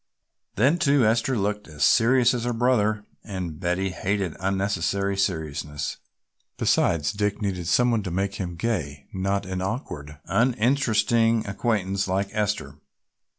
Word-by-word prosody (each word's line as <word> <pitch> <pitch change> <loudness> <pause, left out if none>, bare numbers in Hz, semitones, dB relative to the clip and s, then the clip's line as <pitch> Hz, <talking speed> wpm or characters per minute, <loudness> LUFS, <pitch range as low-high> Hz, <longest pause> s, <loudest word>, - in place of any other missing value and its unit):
Then, 140 - +3
too, 140 -5 +4
Esther 115 +3 +2
looked 105 +1 -2
as 75 -2 -4
serious 125 +2 +5
as 120 -2 -2
her 120 - 0
brother 110 -3 +1 0.2
and 90 -7 -5
Betty 90 +2 -1
hated 95 -2 -2
unnecessary 100 +1 0
seriousness, 75 -6 -2 0.6
besides 75 -3 +2
Dick 105 -1 -1
needed 95 -5 -3
some 120 +8 +3
one 115 -2 +1
to 95 - -4
make 95 +3 -1
him 90 -2 -4
gay, 80 -8 -3
not 95 +1 -1
an 95 0 -4
awkward, 75 - -5
uninteresting 115 -1 +2
acquaintance 100 -2 -1
like 95 +1 0
Esther. 105 -1 -2
100 Hz, 135 wpm, -25 LUFS, 95-115 Hz, 0.6 s, serious